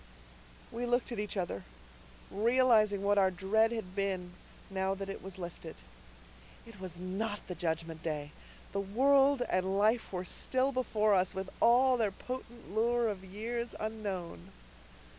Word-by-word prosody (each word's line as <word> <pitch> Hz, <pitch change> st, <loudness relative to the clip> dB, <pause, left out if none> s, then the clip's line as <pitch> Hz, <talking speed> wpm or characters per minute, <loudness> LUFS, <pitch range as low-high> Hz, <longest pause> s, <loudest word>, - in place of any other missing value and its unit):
We 240 Hz, +1 st, -3 dB
looked 245 Hz, +1 st, +1 dB
at 235 Hz, -, -3 dB
each 210 Hz, 0 st, -3 dB
other, 175 Hz, -, -2 dB, 0.7 s
realizing 220 Hz, -2 st, +4 dB
what 205 Hz, 0 st, +4 dB
our 190 Hz, -1 st, +5 dB
dread 200 Hz, +5 st, +2 dB
had 205 Hz, -5 st, -5 dB
been, 190 Hz, -3 st, -1 dB, 0.4 s
now 190 Hz, 0 st, 0 dB
that 195 Hz, 0 st, -5 dB
it 195 Hz, -, -5 dB
was 190 Hz, -1 st, -7 dB
lifted. 170 Hz, -2 st, -7 dB, 0.9 s
It 230 Hz, -4 st, -13 dB
was 180 Hz, -2 st, -6 dB
not 205 Hz, +4 st, -3 dB
the 180 Hz, -, -5 dB
Judgment 165 Hz, -1 st, -3 dB
Day. 150 Hz, -3 st, -3 dB, 0.4 s
The 200 Hz, -, -1 dB
world 270 Hz, +6 st, +4 dB
and 190 Hz, +1 st, 0 dB
life 220 Hz, +3 st, +2 dB
were 185 Hz, -1 st, -3 dB
still 260 Hz, +8 st, 0 dB
before 215 Hz, -5 st, +2 dB
us, 185 Hz, -1 st, +2 dB
with 190 Hz, 0 st, -4 dB
all 250 Hz, +2 st, +5 dB
their 220 Hz, -3 st, +2 dB
potent 235 Hz, 0 st, -8 dB
lure 235 Hz, +1 st, +2 dB
of 195 Hz, -3 st, -5 dB
years 230 Hz, +5 st, -4 dB
unknown. 195 Hz, -, -4 dB
200 Hz, 150 wpm, -32 LUFS, 185-235 Hz, 0.9 s, our